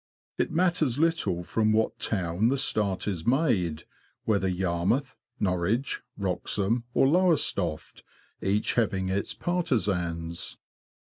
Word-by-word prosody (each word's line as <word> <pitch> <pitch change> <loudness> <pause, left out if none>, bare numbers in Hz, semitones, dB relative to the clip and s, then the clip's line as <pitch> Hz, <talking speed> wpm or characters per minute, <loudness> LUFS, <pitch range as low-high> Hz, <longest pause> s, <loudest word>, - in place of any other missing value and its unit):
It - - +1
matters 165 -6 +1
little 160 - +1
from 110 +4 +1
what 110 +1 +1
town 95 +1 0
the 135 - +1
start 105 -8 0
is 90 -5 -3
made, 105 - +1 0.4
whether 100 -4 +2
Yarmouth, 95 +8 0 0.2
Norwich, 100 +7 0 0.2
Wroxham, 100 +4 -1
or 135 - +5
Lowestoft, 145 - +1 0.4
each 100 +2 +1
having 95 -5 0
its 100 +1 -2
partisans. 90 - -1
105 Hz, 110 wpm, -27 LUFS, 90-130 Hz, 0.4 s, or